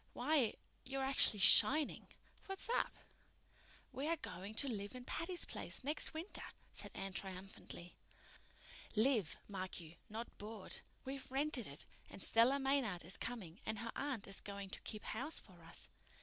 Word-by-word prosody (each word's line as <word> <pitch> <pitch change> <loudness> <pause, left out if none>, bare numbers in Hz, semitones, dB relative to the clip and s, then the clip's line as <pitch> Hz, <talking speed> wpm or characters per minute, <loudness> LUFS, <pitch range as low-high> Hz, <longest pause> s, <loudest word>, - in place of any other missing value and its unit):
Why, 260 -3 +2 0.3
you're 270 +1 -2
actually 265 -5 +6
shining! 280 +9 +7 0.4
What's 390 0 -2
up?" - - +1 1.0
"We 270 +3 -3
are 335 - +2
going 195 - -6
to 280 - +2
live 205 -2 -4
in 250 -1 -7
Patty's 345 +5 +1
Place - - -4
next 295 +4 +5
winter," 325 +5 -4 0.3
said - - -5
Anne 195 0 -4
triumphantly. 190 -2 -7 1.0
"Live, 220 - +2
mark 190 -2 -4
you, 165 0 -11
not 225 +2 -6
board! 210 -1 -5 0.3
We've 270 0 -5
rented 275 -4 0
it, 140 - -7 0.2
and 195 - -8
Stella 235 +5 +5
Maynard 265 - +1
is 185 - -3
coming, 215 -7 -5
and 220 - -2
her 230 +2 -4
aunt 265 -7 -2
is 195 - -1
going 200 -1 -6
to - - -4
keep 215 - -5
house 270 +8 0
for - - -9
us." - - -8
230 Hz, 155 wpm, -39 LUFS, 195-275 Hz, 1.0 s, shining